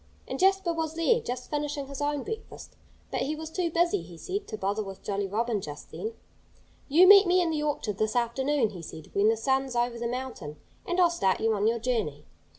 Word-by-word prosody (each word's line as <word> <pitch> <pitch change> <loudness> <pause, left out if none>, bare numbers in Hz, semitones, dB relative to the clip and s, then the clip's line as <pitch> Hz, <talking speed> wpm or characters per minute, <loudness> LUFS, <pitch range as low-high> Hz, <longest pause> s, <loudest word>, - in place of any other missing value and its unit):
And - - -4
Jasper 380 -2 +3
was 320 -1 -3
there, 335 +9 +3
just 250 0 -5
finishing 295 -1 -2
his 275 +1 -7
own 290 -1 0
breakfast. 445 0 -8 0.4
But - - -1
he 300 +3 -1
was 315 0 -7
too 350 0 -1
busy, 345 +4 +2
he 170 - -12
said, 395 - -4
to 215 - -5
bother 205 +1 -1
with 195 -2 -8
Jolly 200 -1 -2
Robin 220 +1 -1
just 150 -3 -9
then. 445 +1 -5 0.7
"You 335 +6 +6
meet 400 -1 +9
me 360 +1 +4
in 345 -2 +1
the 305 -1 -1
orchard 285 -9 -2
this 215 +1 0
afternoon," 245 +1 +1
he 180 -4 -8
said, 160 -1 -10
"when 205 +2 +4
the 225 - +2
sun's 265 +2 0
over 240 0 0
the 235 - -1
mountain, 245 - -5 0.3
and 355 +1 0
I'll 350 -2 +5
start 195 - +1
you 225 0 +2
on 210 0 +1
your 230 +1 +2
journey." 220 - -2
265 Hz, 220 wpm, -28 LUFS, 215-330 Hz, 0.7 s, meet